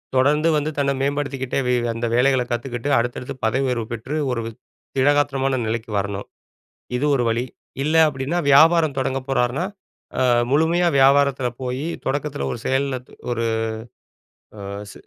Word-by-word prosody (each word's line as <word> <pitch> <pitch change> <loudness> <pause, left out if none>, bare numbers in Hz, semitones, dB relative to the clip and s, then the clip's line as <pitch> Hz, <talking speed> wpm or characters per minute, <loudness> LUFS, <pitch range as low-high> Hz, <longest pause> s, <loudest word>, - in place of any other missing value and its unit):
தொடர்ந்து 150 +5 +3
வந்து 150 +1 -1
தன்ன 140 -1 +1
மேம்படுத்திக்கிட்டே 140 -2 -1
வே 125 - +2 0.2
அந்த 115 +1 -3
வேலைகள 130 +1 +3
கத்துக்கிட்டு 120 +2 -3
அடுத்தடுத்து 120 +3 -2
பதவி 130 +5 +1
உயர்வு 120 -3 -1
பெற்று 120 +6 -4 0.2
ஒரு 120 -2 -1 0.5
திடகாத்திரமான 135 -1 +2
நிலைக்கு 115 +1 -3
வரணும். 100 0 -4 0.7
இது 130 - 0
ஒரு 125 - +1
வழி. 115 +2 0 0.4
இல்ல 155 +2 0
அப்டின்னா 140 +4 -2
வியாபாரம் 155 0 +5
தொடங்க 135 0 0
போறார்ன்னா, 125 +5 +1 0.5
ஆ - - +2 0.3
முழுமையா 165 +4 +3
வியாபாரத்தில 135 -1 +4
போய் 130 +3 -3 0.2
தொடக்கத்தில 145 +1 -2
ஒரு - - -4
செயல்ல 135 0 0
து - - -20 0.2
ஒரு 115 -1 -1 1.1
ஆ - - -9 0.3
சு - - -13
135 Hz, 140 wpm, -22 LUFS, 125-145 Hz, 1.1 s, வியாபாரம்